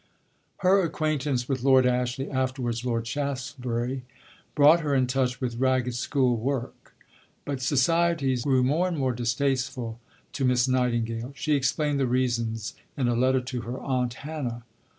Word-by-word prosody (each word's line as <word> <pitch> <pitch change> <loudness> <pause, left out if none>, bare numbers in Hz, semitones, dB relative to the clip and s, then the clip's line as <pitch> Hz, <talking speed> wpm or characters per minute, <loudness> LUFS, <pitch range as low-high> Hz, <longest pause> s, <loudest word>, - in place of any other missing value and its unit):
Her 195 +2 +6
acquaintance 150 -6 -1
with 135 -3 -1
Lord 130 0 +5
Ashley 125 +2 0
(afterwards 130 -3 -2
Lord 115 -2 -1
Shaftesbury) 130 -2 -3 0.5
brought 150 +3 +7
her 145 -4 0
in 130 -1 +3
touch 125 -1 0
with 120 -3 -3
Ragged 130 -1 +1
School 125 0 +1
work. 125 +2 -4 0.5
But 140 -2 -3
society 150 +1 +2
grew 130 +1 +2
more 155 +8 +2
and 175 -3 -3
more 130 -3 0
distasteful 125 -1 -1 0.3
to 140 - -2
Miss 125 0 +3
Nightingale. 120 -1 0
She 150 +2 0
explained 145 +1 +1
the 135 - +2
reasons 115 -3 -1 0.2
in 130 -3 +1
a 120 - +1
letter 130 +2 +2
to 125 -1 -5
her 120 +3 -5
"Aunt 125 -3 -1
Hannah." 140 -6 -5
130 Hz, 150 wpm, -26 LUFS, 120-140 Hz, 0.5 s, brought